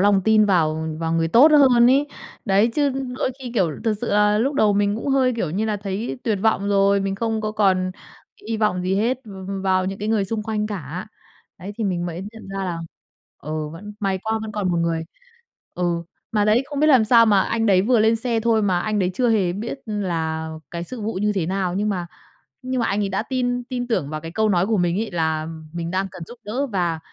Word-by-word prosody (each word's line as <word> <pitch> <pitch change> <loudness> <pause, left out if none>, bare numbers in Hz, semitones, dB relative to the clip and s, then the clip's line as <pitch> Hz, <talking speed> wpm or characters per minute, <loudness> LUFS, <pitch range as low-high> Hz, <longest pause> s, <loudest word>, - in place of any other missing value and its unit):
lòng 200 0 +4
tin 220 -1 +5
vào 160 -4 +1
vào 165 0 -2
người 165 0 +1
tốt 265 - +7
hơn 255 -5 +6
ấy. 280 +2 +3 0.4
Đấy, 200 +1 +3
chứ 290 -2 +2 0.3
đôi - - 0
khi, 255 -2 -7
kiểu, 185 -7 +2
thực 220 -2 +2
sự 240 - -2
là 210 0 +3
lúc 270 +5 0
đầu 210 -6 +3
mình 205 +1 +1
cũng 230 - -4
hơi, 265 -2 +3
kiểu 180 -9 -1
như 200 +7 -1
là, 215 -1 -1
thấy 200 +4 -4
tuyệt 215 -4 0
vọng 210 -2 +2
rồi, 200 0 +3
mình 195 0 -1
không 225 +1 -1
có 215 0 -3
còn 190 -3 +2 0.6
hy 225 - -1
vọng 210 -4 0
gì 185 +1 0
hết 235 +6 +1
v 215 - -12 0.3
vào 185 -1 +2
những 195 +1 -4
cái 210 - -3
người 215 -3 +2
xung 215 +2 -3
quanh 210 -1 -2
cả. 180 -4 -6 0.5
Đấy, 190 +4 -7
thì 225 - -1
mình 175 -3 -1
mới 170 0 -5
nhận 225 -3 -12
ra 195 0 -4
là, 175 -2 -3 0.6
ừ, 155 +1 -4
vẫn 205 +7 -9
may 195 -2 0
quá, 220 0 -1
vẫn 220 -1 -6
còn 205 -3 -1
một 175 - 0
người. 165 -1 0 0.7
Ừ, 175 -1 -1 0.3
mà 210 -2 +2
đấy, 215 +4 +3
không 285 0 -4
biết 305 - +4
làm 260 -7 +6
sao 230 +1 +6
mà 205 -3 +4
anh 225 0 -1
đấy 190 -3 +4
vừa 235 +2 +3
lên 220 +1 +4
xe 230 0 0
thôi 225 -1 +2
mà 185 -3 +1
anh 215 +2 -1
đấy 185 -2 +1
chưa 245 +3 +1
hề 195 -6 +2
biết 225 +8 -5
là 165 -6 -2 0.2
cái 170 0 -4
sự 250 +5 -7
vụ 215 +2 -2
như 210 +2 0
thế 190 -5 -1
nào 185 -1 -1
nhưng 210 +2 0
mà 180 -4 -2 0.6
nhưng 255 0 -2
mà - - +1
anh 200 +1 0
ấy 195 - -1
đã 195 +3 -1
tin 245 -1 -1
tin 245 -1 -4
tưởng 185 - -1
vào 155 0 -5
cái 165 +1 -7
câu 220 +4 +1
nói 185 -1 +2
của 220 -2 +1
mình 175 +1 +1
ấy, 220 - -3
là 160 -2 -1 0.3
mình 170 0 -4
đang 190 +1 0
cần 185 - -10
giúp 240 - -12
đỡ 245 +7 -2
và 175 -7 -1
205 Hz, 245 wpm, -22 LUFS, 180-225 Hz, 0.7 s, tốt